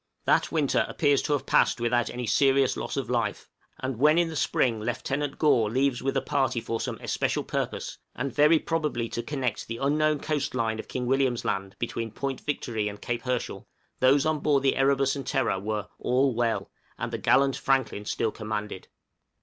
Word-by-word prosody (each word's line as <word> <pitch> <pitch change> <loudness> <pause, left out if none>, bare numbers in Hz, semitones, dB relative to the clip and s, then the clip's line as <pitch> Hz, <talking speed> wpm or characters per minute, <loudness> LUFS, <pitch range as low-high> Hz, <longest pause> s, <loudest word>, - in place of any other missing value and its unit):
That - - +2
winter 150 -4 +2
appears 145 -3 +2
to 150 - -1
have 145 - -1
passed - - +3
without 120 0 +1
any 125 0 -4
serious 135 +3 +3
loss - - -4
of - - -2
life; - - -1 0.3
and 130 -2 -3
when 150 +4 +5
in 170 -1 +3
the 160 - -6
spring 120 -5 +1
Lieutenant 135 +5 -2
Gore 120 -8 +3
leaves 130 +2 +1
with 135 +1 0
a - - 0
party 135 -4 0
for 115 0 -3
some - - -3
especial - - -1
purpose, - - -3 0.2
and 140 +2 -3
very 150 +2 +5
probably 150 -8 -1
to 120 - -3
connect 130 -5 -3
the 115 - -4
unknown 150 +3 +2
coast 145 -3 -2
line 110 -3 0
of - - -7
King 125 -1 -3
William's 130 -1 +1
Land 95 0 -2
between 115 -1 -3
Point 135 +4 -4
Victory 115 -7 -2
and 105 0 -6
Cape 120 +1 -3
Herschel, 125 -2 -3 0.3
those 135 +3 +4
on 155 -1 +1
board 140 -2 +2
the 135 - +3
'Erebus' 135 0 +2
and 140 - -6
'Terror' 130 -8 +1
were 105 0 -3
"all 130 +1 +2
well," 115 -1 -1 0.3
and - - -4
the - - -2
gallant 135 0 +3
Franklin 130 -6 0
still 110 - -1
commanded. 105 -3 -4
{DISCOVERY - - -23
OF - - -41
CROZIER'S - - -53
RECORD. - - -53
130 Hz, 205 wpm, -27 LUFS, 115-140 Hz, 0.3 s, when